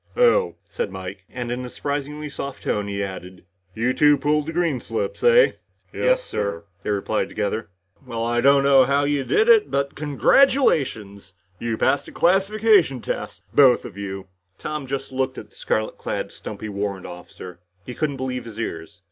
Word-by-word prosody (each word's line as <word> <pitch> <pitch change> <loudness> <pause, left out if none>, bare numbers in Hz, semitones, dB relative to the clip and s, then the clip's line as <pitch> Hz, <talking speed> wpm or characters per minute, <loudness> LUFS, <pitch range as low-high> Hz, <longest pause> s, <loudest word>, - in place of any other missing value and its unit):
"Oh?" 485 -1 +4
said 480 - -3
Mike. - - -8
And 120 -1 -5
in 125 +1 -3
a 125 - -6
surprisingly 145 +2 -4
soft 140 -1 -7
tone 105 -1 -1
he 100 0 -2
added, 95 -1 -8 0.3
"You 120 +3 +1
two 150 +1 +5
pulled 150 +2 0
green 165 -6 0
slips, 480 +2 -4
eh?" 480 +1 +6 0.4
"Yes, - - +2
sir," 100 - -3 0.2
they - - -5
replied 105 +1 -1
together. 105 +1 -3 0.3
"Well, 115 -3 -4
I 120 0 +1
don't 140 +1 +5
know 135 -1 +6
how 140 +2 +2
you 145 -1 0
did 430 - +2
it, 445 -3 +6
but 140 0 -1
congratulations. 135 - +2 0.2
You 115 -1 -2
passed 140 - +1
the - - -10
classification 195 - +3
tests. - - -5
Both 130 -4 +5
of 100 - -9
you." 95 -1 -6 0.3
Tom 150 -3 -5
just 135 +1 -4
looked 130 0 -2
at - - -9
the - - -21
scarlet 110 0 -2
clad, - - -4
stumpy 110 - -7
warrant 100 -2 -4
officer. 90 0 -10 0.3
He 125 - -6
couldn't 145 0 -2
believe 125 -1 -4
his 115 -1 -9
ears. 85 -2 -5
130 Hz, 175 wpm, -23 LUFS, 105-150 Hz, 0.4 s, eh